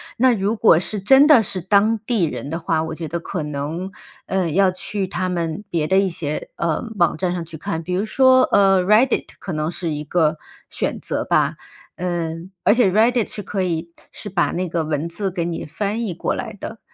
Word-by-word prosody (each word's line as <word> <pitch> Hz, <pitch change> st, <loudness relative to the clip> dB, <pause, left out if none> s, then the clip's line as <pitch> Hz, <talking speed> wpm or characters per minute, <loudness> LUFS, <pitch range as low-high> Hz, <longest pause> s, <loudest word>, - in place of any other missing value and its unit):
那 255 Hz, +1 st, +4 dB
如 205 Hz, +2 st, 0 dB
果 210 Hz, -7 st, +5 dB
是 205 Hz, +2 st, -2 dB
真 270 Hz, +8 st, +6 dB
的 275 Hz, -8 st, +7 dB
是 190 Hz, -1 st, -1 dB
当 205 Hz, +4 st, +2 dB
地 230 Hz, -8 st, +1 dB
人 150 Hz, -2 st, -3 dB
的 165 Hz, +2 st, -3 dB
话， 165 Hz, -1 st, 0 dB
我 160 Hz, 0 st, -4 dB
觉 160 Hz, -3 st, -6 dB
得 170 Hz, +1 st, -2 dB
可 170 Hz, -1 st, -4 dB
能， 150 Hz, +6 st, -4 dB, 0.4 s
呃， 190 Hz, -3 st, 0 dB
要 190 Hz, +3 st, +3 dB
去 195 Hz, +2 st, -3 dB
他 185 Hz, 0 st, -3 dB
们 170 Hz, +1 st, -3 dB
别 165 Hz, -4 st, 0 dB
的 190 Hz, +4 st, +2 dB
一 195 Hz, 0 st, +3 dB
些， 155 Hz, -3 st, -4 dB
呃， 165 Hz, -2 st, -1 dB, 0.2 s
网 170 Hz, -3 st, +2 dB
站 180 Hz, 0 st, -1 dB
上 175 Hz, -2 st, -3 dB
去 160 Hz, -1 st, -10 dB
看， 165 Hz, +1 st, -4 dB
比 180 Hz, -, -4 dB
如 195 Hz, +4 st, 0 dB
说， 260 Hz, +2 st, +5 dB
呃 195 Hz, -2 st, +4 dB
，Reddit 215 Hz, +7 st, +3 dB
可 190 Hz, -, -7 dB
能 155 Hz, 0 st, -1 dB
是 170 Hz, -1 st, -3 dB
一 150 Hz, -1 st, -4 dB
个 160 Hz, -2 st, +1 dB, 0.3 s
选 -, -, -2 dB
择 -, -, -1 dB
吧。 -, -, +2 dB, 0.4 s
嗯， 170 Hz, 0 st, -3 dB
而 205 Hz, -, +5 dB
且 235 Hz, -5 st, +4 dB
Reddit 225 Hz, +4 st, +2 dB
是 205 Hz, -, -7 dB
可 195 Hz, 0 st, -2 dB
以 170 Hz, -1 st, -2 dB, 0.2 s
是 205 Hz, -, -6 dB
把 175 Hz, -2 st, +1 dB
那 180 Hz, -1 st, -2 dB
个 165 Hz, -2 st, -1 dB
文 155 Hz, +2 st, -2 dB
字 195 Hz, +3 st, -2 dB
给 175 Hz, -2 st, -3 dB
你 170 Hz, -1 st, -4 dB
翻 210 Hz, +8 st, -3 dB
译 180 Hz, -, -3 dB
过 170 Hz, -, -2 dB
来 -, -, -5 dB
的。 220 Hz, +3 st, -8 dB
180 Hz, 265 characters per minute, -21 LUFS, 165-205 Hz, 0.4 s, 的